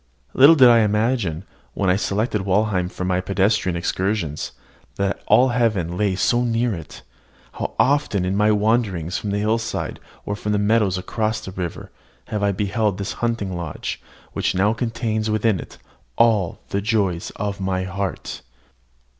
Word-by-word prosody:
Little 140 +5 +8
did 130 -5 +7
I 120 -1 +7
imagine, 105 -5 0 0.3
when 95 -2 +2
I - - +3
selected 105 +2 -1
Walheim 95 -1 +1
for 90 - -5
my 90 0 +1
pedestrian 95 0 +1
excursions, 90 -2 -2 0.4
that 100 0 -1
all 130 +1 +5
heaven 110 -8 0
lay 100 0 +1
so 120 +5 +2
near 120 0 0
it. 85 -4 -9 0.5
How - - -5
often 140 -9 +2
in 95 +1 -1
my 105 +1 +3
wanderings 105 -5 +1
from 105 - -4
the 100 - 0
hillside 110 +2 -1 0.3
or 100 - -2
from 105 0 -2
the - - +2
meadows 105 -2 +2
across 110 +3 -2
the 95 - -7
river, 90 -3 -6 0.4
have 105 - -2
I 100 0 +2
beheld 100 +1 0
this 100 0 -3
hunting 115 -6 -1
lodge, 85 -4 -5 0.3
which - - -1
now 100 +4 +3
contains 110 -1 -2
within 110 -2 +1
it - - -10 0.4
all 110 -7 +2
the 100 - -1
joy 100 -5 +1 0.2
of 100 -1 -3
my 95 -1 -1
heart! 95 +1 -4
105 Hz, 160 wpm, -22 LUFS, 95-110 Hz, 0.5 s, Little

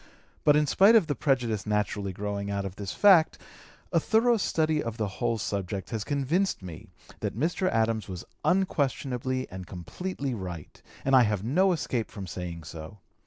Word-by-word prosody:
But 150 - +5
in 150 0 +4
spite 200 +9 +5
of 215 -6 +6
the 145 - -1
prejudice 120 -8 0
naturally 105 -1 -1
growing 100 +1 -4
out 100 -1 -2
of 95 -1 -6
this 100 -2 -5
fact, 185 -6 +5 0.6
a - - +5
thorough 235 +1 +3
study 155 -5 +1
of 115 -1 -5
the 110 -3 -1
whole 120 -1 +1
subject 100 -2 -3
has 110 -3 -2
convinced 145 - 0
me 85 -4 -9 0.3
that - - -3
Mr. 175 - +1
Adams 110 -1 0
was 90 -1 -6 0.2
unquestionably 130 -8 0
and 95 0 -7
completely 140 - -5
right, 90 -7 -7 0.2
and 135 0 +4
I 130 - +8
have 105 -4 +1
no 180 - +3
escape 130 -8 -2
from 100 -2 -7
saying 85 -2 -6
so. 80 +5 -9
115 Hz, 170 wpm, -28 LUFS, 100-150 Hz, 0.6 s, I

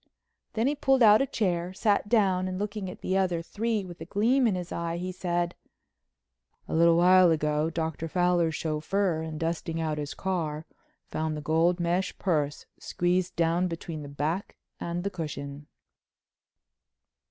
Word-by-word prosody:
Then 225 +1 0
he 280 - +2
pulled 270 -3 +3
out 215 +1 +7
a 275 - +1
chair, 180 -6 -1
sat 205 +1 +1
down 190 -5 +3
and, 185 0 -3
looking 205 -1 -3
at 180 - -10
the 185 - -1
other 175 -3 0
three 215 +2 -2
with 175 -2 -11
a - - -5
gleam 235 +8 +2
in 205 - +1
his 180 -1 -5
eye, 170 0 -2 0.2
said: 175 -2 -1 1.1
"A - - -5
little 170 +1 +5
while 180 +1 +6
ago 150 -1 +1
Dr. 160 0 -3
Fowler's 175 -1 +2
chauffeur 160 +3 -1
in 160 -1 -5
dusting 165 +1 -2
out 155 -2 -1
his 145 0 -5
car 160 -5 -2 0.4
found 155 -1 -3
the - - -5
gold 165 +4 +2
mesh 175 +2 0
purse 150 -6 -1
squeezed 180 +1 0
down 170 +2 +2
between 165 -2 -6
the 145 - -8
back 150 +7 -3 0.2
and 170 +1 -3
the 200 - -2
cushion." 145 -4 -6
175 Hz, 160 wpm, -28 LUFS, 160-190 Hz, 1.1 s, out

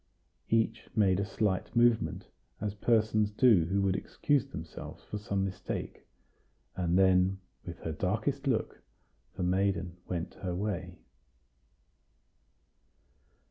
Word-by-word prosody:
Each 115 0 +1
made 95 -4 +4
a 100 - 0
slight 100 0 -1
movement, 120 -1 +3 0.3
as 105 -1 -2
persons 110 -1 +2
do 105 -5 +5
who 100 +3 +1
would 95 -1 +2
excuse 140 +5 0
themselves 80 -11 -8
for 105 - -5
some 100 -1 -1
mistake; 95 -1 -5 0.7
and 90 -1 +1
then, 95 0 +4 0.3
with 85 -1 -7
her 80 - -3
darkest 110 - -1
look, 115 -5 -1 0.5
the - - -3
maiden 90 -1 0
went 85 -2 -3
her 90 -2 -2
way. 90 -3 -3
100 Hz, 115 wpm, -31 LUFS, 90-110 Hz, 0.7 s, do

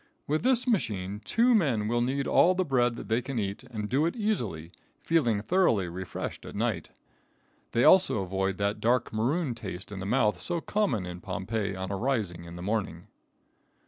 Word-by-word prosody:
With 155 +2 0
this 255 0 +2
machine 105 - -1
two 240 +2 +3
men 130 - +2
will 120 +2 +1
knead 135 +3 0
all 185 +2 +4
the 185 0 0
bread 125 -4 +2
they 115 +1 -1
can 130 +1 -5
eat 100 -2 -2
and 110 -4 -5
do 140 +8 +2
it 170 - -3
easily, 115 - -2 0.3
feeling 120 -11 +2
thoroughly 115 - +2
refreshed 90 +1 -6
at - - -9
night. - - -1 0.8
They 120 - +3
also 185 - +5
avoid 95 +1 -1
that 100 +1 -1
dark 120 +1 +1
maroon 130 +6 0
taste 95 -3 -7
in 100 - -6
the 95 - -4
mouth 105 -6 +2
so 170 - -1
common 160 - 0
in 90 0 -7
Pompeii 100 +2 -3
on 95 0 -4
arising 100 -6 -2
in 85 0 -9
the 90 - -7
morning. 95 -5 -3
110 Hz, 175 wpm, -28 LUFS, 95-140 Hz, 0.8 s, also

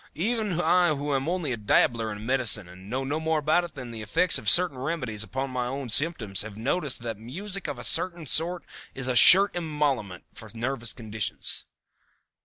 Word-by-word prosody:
Even 210 -1 -1
I 175 -3 +3
who 145 +1 -3
am 135 +3 -1
only 175 -6 -2
a 120 - -2
dabbler 110 +1 +1
in 105 +1 -8
medicine, 120 -6 +2
and 90 +2 -13
know 130 +3 -2
no 145 +4 -2
more 160 0 0
about 155 +4 +2
it 165 - -12
than 125 -3 -7
the 115 -1 -7
effects 165 - +3
of 110 - +1
certain 175 -7 +5
remedies 125 -7 -3
upon 130 +5 -4
my 125 -1 -2
own 135 0 -5
symptoms, 115 - 0
have 105 -1 -8
noticed 135 +2 -1
that 115 -3 -5
music 185 - -6
of 140 - -5
a 120 - -7
certain 170 +4 +1
sort 170 +5 -1 0.3
is 130 -1 -3
a 130 - -1
sure 195 - +8
emollient 150 - -2
for 110 - -11
nervous 120 0 -2
conditions." 110 -3 -3
135 Hz, 195 wpm, -26 LUFS, 115-165 Hz, 0.3 s, sure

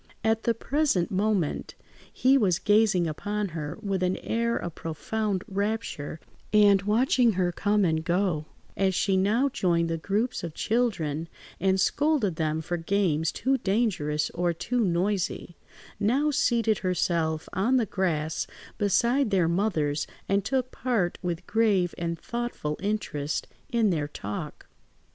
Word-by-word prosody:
At 220 0 +1
the 235 - +2
present 270 - 0
moment 195 -4 0 0.4
he 260 +2 +3
was 195 -10 +3
gazing 205 -4 +3
upon 205 +6 -2
her 155 -2 -5
with 195 -2 -1
an 185 0 +1
air 235 +1 -1
of 175 - -5
profound 195 +5 -3
rapture, 200 -7 -3 0.3
and 205 -2 +6
watching 230 +3 +3
her 180 -1 +1
come 205 +2 +1
and 160 -2 +1
go, 175 -3 0 0.3
as 190 -1 +1
she 195 +1 +2
now 210 +8 +3
joined 170 -10 +1
the 165 - -2
groups 215 +9 -1
of 170 -3 -5
children 170 -10 -1 0.3
and 190 +1 +2
scolded 250 - +1
them 155 0 0
for 175 +2 -3
games 165 -3 +1
too 265 +3 0
dangerous 190 -9 0
or 175 0 0
too 245 +9 -2
noisy; 185 -3 0 0.4
now 265 +9 +2
seated 235 -7 +2
herself 170 -3 0
on 235 +8 +2
the 235 - +2
grass 160 -6 -1 0.3
beside 235 +6 +2
their 185 -5 +2
mothers 165 -6 0 0.2
and 200 0 +1
took 255 +3 -1
part 230 -9 -1
with 175 -1 -3
grave 205 -6 +2
and 170 -1 -2
thoughtful 235 -11 -4
interest 185 -8 -2 0.2
in 230 -6 +2
their 150 -4 -1
talk. 105 -8 -6
195 Hz, 140 wpm, -27 LUFS, 170-225 Hz, 0.4 s, and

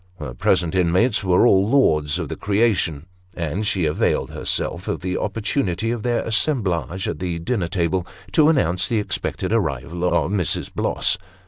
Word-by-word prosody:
Her 75 -7 -6
present 85 +7 +1
inmates 95 +6 +2
were 90 +3 +4
all 100 -3 +4
lords 75 - +3
of 85 -4 -3
the - - -5
creation, 100 -8 0 0.3
and 85 +5 -2
she 95 -5 0
availed 75 0 0
herself 85 +2 -1
of - - -2
the 90 0 -2
opportunity 105 -1 -1
of 120 -2 -3
their 120 +1 0
assemblage 95 - 0
at - - -4
the 90 -2 -3
dinner 90 +2 -2
table, 90 0 -1 0.2
to 150 +7 +4
announce 95 - +1
the 115 - 0
expected 95 0 -2
arrival 85 - -2
of 90 -2 +1
Mrs. 95 -5 -1
Bloss. - - +1
95 Hz, 160 wpm, -21 LUFS, 85-110 Hz, 0.3 s, were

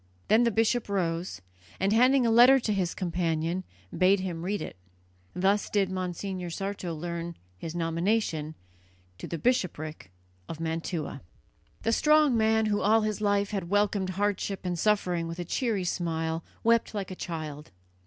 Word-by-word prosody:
Then 220 +3 +5
the - - +4
bishop 225 +1 +1
rose, 170 - -2 0.4
and, 195 +3 +2
handing 255 +3 +5
a 230 - +3
letter 245 +4 +7
to 220 -4 -1
his 185 -3 -1
companion, 170 0 -1 0.3
bade 190 +2 +4
him 180 -3 -4
read 200 +3 -1
it. - - -6 0.6
Thus 195 +3 +2
did 195 -2 +1
Monsignor 185 0 -4
Sarto 195 -1 -4
learn 170 +1 -5 0.2
his 165 0 -6
nomination 165 -2 0 0.6
to - - -6
the 170 - -4
bishopric 160 - -1 0.4
of 160 - -6
Mantua. 165 -1 -3 0.6
The 225 - +2
strong 300 +1 +4
man 220 0 +3
who 205 -1 +1
all 220 +2 +4
his 215 0 -2
life 205 0 +1
long 195 - 0
had 170 - -9
welcomed 205 -1 +1
hardship 200 0 -1
and 175 -2 -2
suffering 180 -5 +1
with 165 +1 -6
a 175 - -4
cheery 220 0 -1
smile, 165 -2 -2 0.2
wept 230 -1 +2
like 195 -2 -3
a - - -5
child. 155 -4 -6
190 Hz, 160 wpm, -28 LUFS, 170-215 Hz, 0.6 s, letter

